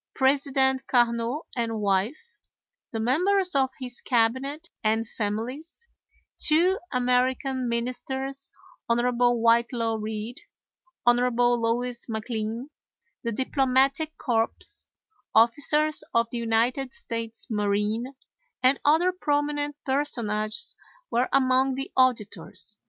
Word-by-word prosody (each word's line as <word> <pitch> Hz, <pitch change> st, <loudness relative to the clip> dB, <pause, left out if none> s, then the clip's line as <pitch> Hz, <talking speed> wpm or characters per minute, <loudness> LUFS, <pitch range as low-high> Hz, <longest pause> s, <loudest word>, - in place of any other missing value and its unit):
President 265 Hz, -1 st, +2 dB
Carnot 235 Hz, +3 st, +1 dB
and 230 Hz, -2 st, -1 dB
wife, 205 Hz, -, -1 dB, 0.5 s
the 225 Hz, -, -4 dB
members 360 Hz, -, +2 dB
of 270 Hz, -2 st, +2 dB
his 250 Hz, -2 st, -7 dB
cabinet, 260 Hz, +6 st, 0 dB, 0.2 s
and 220 Hz, +1 st, +1 dB
families; 245 Hz, -, -5 dB, 0.5 s
two 350 Hz, +5 st, +4 dB
American 250 Hz, +1 st, +1 dB
ministers, 265 Hz, +3 st, -3 dB, 0.4 s
Hon. 235 Hz, -, +3 dB, 0.4 s
Whitelaw 230 Hz, 0 st, +2 dB
Reid, 220 Hz, +3 st, -5 dB, 0.6 s
Hon. 240 Hz, 0 st, +6 dB, 0.4 s
Louis 240 Hz, +1 st, -1 dB
MacLean; 225 Hz, +3 st, -4 dB, 0.5 s
the 235 Hz, -, -2 dB
Diplomatic 270 Hz, +5 st, +1 dB
Corps, 225 Hz, -4 st, +1 dB, 0.9 s
officers 295 Hz, +7 st, +3 dB
of 230 Hz, 0 st, +3 dB
the 240 Hz, -, -3 dB
United 235 Hz, +3 st, 0 dB
States 230 Hz, -1 st, -5 dB
Marine, 210 Hz, +5 st, -1 dB, 0.5 s
and 260 Hz, +2 st, +4 dB
other 325 Hz, +5 st, +4 dB
prominent 290 Hz, -3 st, -1 dB
personages 240 Hz, -, -2 dB, 0.4 s
were 245 Hz, +2 st, +1 dB
among 260 Hz, 0 st, +3 dB
the 270 Hz, +1 st, -5 dB
auditors. 215 Hz, -5 st, 0 dB
250 Hz, 95 wpm, -26 LUFS, 230-275 Hz, 0.9 s, Hon